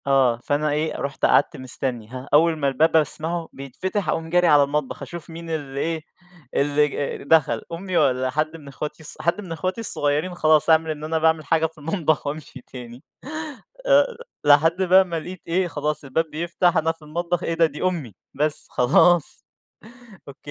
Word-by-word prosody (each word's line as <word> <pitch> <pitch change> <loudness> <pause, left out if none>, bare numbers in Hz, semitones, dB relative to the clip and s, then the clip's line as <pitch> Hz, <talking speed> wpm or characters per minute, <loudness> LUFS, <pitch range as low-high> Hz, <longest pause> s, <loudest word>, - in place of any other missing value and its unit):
آه، 130 -4 +3
فأنا 150 +1 0
إيه 155 +2 -1
رُحت 140 -1 -2
قعدت - - +3
مستَني، 125 -3 -5
هاه، 130 +3 -8
أول 160 +2 +4
ما 140 -2 0
الباب 155 +5 +2
أسمعه 160 +2 0
بيتفتح، 180 - -4
أقوم 160 0 -2
جاري 175 +1 +3
على 145 -3 +6
المطبخ 145 -1 -3
أشوف 170 -2 -8
مين 165 0 -9
اللي 145 -4 -4
إيه، 160 +1 -2 0.5
اللي 145 +1 +2
ج 140 0 -4
دخل، 140 -6 +3
أمي، 180 +1 -3
والّا 130 0 +2
حد 155 +4 -2
من 150 -3 -15
أخواتي 150 +3 -7
الصغ - - -7
حد 170 +5 0
من 185 -4 -10
أخواتي 185 +6 -3
الصغيرين؟ 150 -3 0
خلاص، 155 -2 +3
أعمل 160 0 +4
إن 150 -1 -7
أنا 160 +1 -1
باعمل 160 -1 +2
حاجة 160 +2 +2
في 160 0 -6
المطبخ 155 -1 -1
وأمشي 145 -3 -6
تاني. 125 0 -11 0.8
آآ، - - +4 0.3
لحدّ 160 +5 +4
بقى 190 +1 +5
ما 170 -2 -3
لقيت 180 +3 -9
إيه، 180 +2 +1
خلاص 150 -1 -2
الباب 140 +4 -1
بيفتح، 170 +2 0
أنا 165 +1 +2
في 165 - -16
المطبخ. 170 +3 -3
إيه 165 - -1
ده؟ 165 0 +4
دي 150 -2 -5
أمي، 165 - -2 0.2
بس 150 +2 +2
خلاص. 150 +6 +3 0.8
أوك. 140 - -10
155 Hz, 180 wpm, -23 LUFS, 145-165 Hz, 0.8 s, على